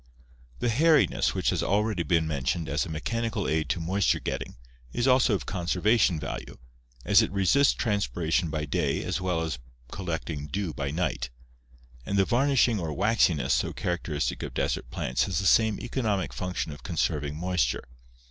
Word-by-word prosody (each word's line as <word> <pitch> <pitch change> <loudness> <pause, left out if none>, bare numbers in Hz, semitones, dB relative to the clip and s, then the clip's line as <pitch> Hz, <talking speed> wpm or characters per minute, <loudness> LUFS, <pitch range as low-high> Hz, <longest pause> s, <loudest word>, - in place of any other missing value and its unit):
The 120 - 0
hairiness 155 +6 +3
which - - +1
has - - 0
already 105 -1 +1
been 80 0 +2
mentioned 75 +1 -1
as 75 +7 -1
a - - -8
mechanical 115 +6 -2
aid 80 -2 0
to 75 - 0
moisture 95 +4 +1
getting - - -5 0.3
is 120 - 0
also 125 -4 +4
of - - -4
conservation 90 0 +1
value, - - -6 0.5
as - - +6
it - - 0
resists 100 +9 +4
transpiration 85 - 0
by 75 -1 -2
day 75 -2 -1
as - - -2
well 90 -3 0
as 75 -7 -3 0.3
collecting 80 -5 -4
dew 90 +1 -3
by 70 -2 -3
night; 75 -5 -2 0.7
and 100 +8 -2
the 95 - +4
varnishing 125 -2 +3
or 80 -3 -3
waxiness 95 -3 +2
so - - 0
characteristic 85 -4 -2
of - - -6
desert - - -1
plants 60 +1 -1
has 95 -5 -2
the 100 - -1
same 110 +1 +4
economic 110 -7 -2
function 90 -4 -3
of 75 - -10
conserving 75 -4 -1
moisture. 85 -6 0
90 Hz, 165 wpm, -27 LUFS, 80-105 Hz, 0.7 s, as